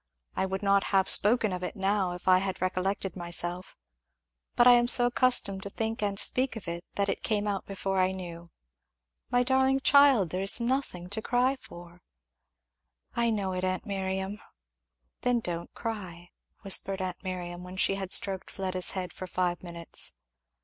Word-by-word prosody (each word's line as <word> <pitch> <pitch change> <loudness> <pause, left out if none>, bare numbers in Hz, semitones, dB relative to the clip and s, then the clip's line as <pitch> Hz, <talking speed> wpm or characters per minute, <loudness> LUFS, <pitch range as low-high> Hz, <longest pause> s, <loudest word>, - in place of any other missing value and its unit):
I 190 - 0
would 190 +2 -4
not 200 0 +3
have 190 -1 +2
spoken 215 -1 +3
of 180 - -4
it 180 - -5
now 195 -2 0
if 180 - -10
I 185 0 +6
had 190 -1 -3
recollected 185 +1 -2
myself, 175 +1 -4 0.8
but 240 - +5
I 250 - +9
am 240 0 +5
so 245 0 +6
accustomed 245 -6 +2
to 200 - -6
think 225 +2 -3
and 200 -1 -1
speak 255 0 +3
of 215 -5 -8
it 170 +1 -5
that 200 0 +1
it - - -2
came 210 -1 0
out 200 -2 -3
before 195 -1 -2
I 185 0 +3
knew 175 -3 -8
it. - - -24 0.8
My 245 0 +2
darling 265 +1 +2
child, 270 - +5
it 185 - -1
is 195 +4 +3
nothing 235 -8 -2
to 220 +2 -2
cry 250 +4 +1
for." 175 -7 -13 1.1
"I 235 0 +2
know 200 -4 -1
it, 185 0 -3
aunt 185 +2 -1
Miriam." 190 0 -3 0.8
"Then 245 -1 +2
don't 170 -5 -5
cry," 185 -7 -6 0.3
whispered 195 0 +1
aunt 185 0 -5
Miriam, 180 -1 -5
when 180 +1 -9
she 195 - +3
had 195 -1 -5
stroked 190 -2 +3
Fleda's 185 -2 -2
head 180 -1 -4
for 185 - -7
five 180 -1 -1
minutes. 170 -2 -7
195 Hz, 175 wpm, -28 LUFS, 180-220 Hz, 1.1 s, I